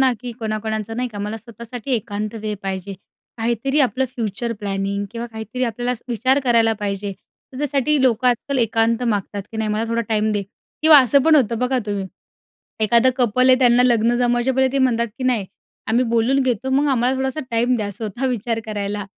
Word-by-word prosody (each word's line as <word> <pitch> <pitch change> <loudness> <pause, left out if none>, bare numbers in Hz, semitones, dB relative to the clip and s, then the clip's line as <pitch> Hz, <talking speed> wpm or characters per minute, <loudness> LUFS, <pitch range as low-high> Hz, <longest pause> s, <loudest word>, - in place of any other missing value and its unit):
ना, 260 -1 +4
की 245 -1 -6
कोणाकोणाचं 220 -1 -3
नाही 250 +1 -1
का, 210 -3 -9
मला 210 +2 -3
स्वतःसाठी 235 +3 -9
एकांत 210 -1 -3
वेळ 210 -1 -2
पाहिजे, 195 0 -4 0.4
काहीतरी 235 +6 0
आपलं 260 0 +1
फ्युचर 230 0 -3
प्लॅनिंग 200 0 -2
किंवा 235 0 -5
काहीतरी 225 +2 -4
आपल्याला 240 +1 -2 0.2
विचार 255 +3 +2
करायला 230 -2 +4
पाहिजे, 200 0 -3 0.4
तर 255 - -8
त्यासाठी 290 0 +1
लोकं 250 -1 +3
आजकाल 260 +3 0
एकांत 225 0 +1
मागतात, 205 -3 -2
की 225 - -6
"नाही, 220 -1 -1
मला 215 +2 0
थोडा 230 0 0
टाईम 215 -1 +1
दे." 205 -1 -1 0.4
किंवा 310 -2 +9
असं 270 +1 +4
पण 320 +1 +5
होतं 230 -4 +2
बघा 250 +1 0
तुम्ही. 200 -2 -2 0.8
एखादं 235 +4 +4
कपल 255 +1 +3
आहे 255 - +6
त्यांना 245 -1 +5
लग्न 235 -1 +3
जमवायच्या 245 +1 +1
पहिले 265 0 +2
ते 275 - +1
म्हणतात, 235 -3 +2
की 255 - -4
"नाही, 235 -6 +1 0.4
आम्ही 240 +3 +2
बोलून 245 +4 +2
घेतो, 255 0 -1
मग 280 +3 +2
आम्हाला 255 0 +1
थोडासा 265 +3 -2
टाईम 240 +2 +2
द्या," 210 -3 -2
स्वतः 220 +5 -4
विचार 230 -2 -2
करायला, 205 -1 -3
235 Hz, 190 wpm, -20 LUFS, 215-255 Hz, 0.8 s, किंवा